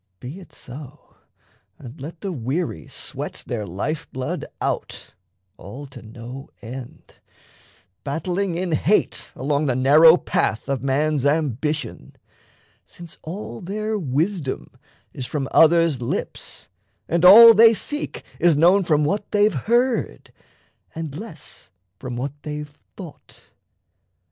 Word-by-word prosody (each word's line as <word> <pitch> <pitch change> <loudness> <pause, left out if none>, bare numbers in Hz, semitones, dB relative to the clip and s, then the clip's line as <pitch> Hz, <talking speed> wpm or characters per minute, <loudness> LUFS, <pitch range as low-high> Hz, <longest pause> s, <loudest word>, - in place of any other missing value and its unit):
Be 140 +9 -8
it 185 - -15
so; 135 +3 -12 0.6
And 130 +3 -12
let 160 +4 -8
the 195 - -3
weary 135 - -3
sweat - - -6
their 110 -4 -4
life 145 - -4
blood 130 0 -4
out - - -4 0.4
All 130 +9 -9
to 135 -3 -12
no 120 +4 -10
end, 120 +2 -10 0.9
battling 175 +5 -2
in 180 0 -2
hate 180 +6 +1
along 145 +3 -1
The 125 - +1
narrow 155 +6 +7
path 110 - -1
of 135 -3 -1
man's 140 +1 0
ambition; 150 0 -1 0.7
Since 170 -2 -12
all 160 - -7
their 215 +4 -3
wisdom 155 0 -2 0.4
is 125 - -5
from 140 -3 -3
others' 165 -4 +4
lips, 120 - -5 0.4
And 170 +1 0
all 230 +5 +11
they 225 +1 +7
seek 295 +7 -4 0.2
is 170 -4 +4
known 180 +5 +5
from 150 -3 +2
what 200 +6 -2
they've 205 0 +3
heard 240 - 0 0.6
And 160 -3 -5
less 200 -2 -10 0.3
from 125 -1 -6
what 130 +3 -3
they've 150 -1 -7 0.2
thought. - - -12
150 Hz, 125 wpm, -22 LUFS, 130-180 Hz, 0.9 s, all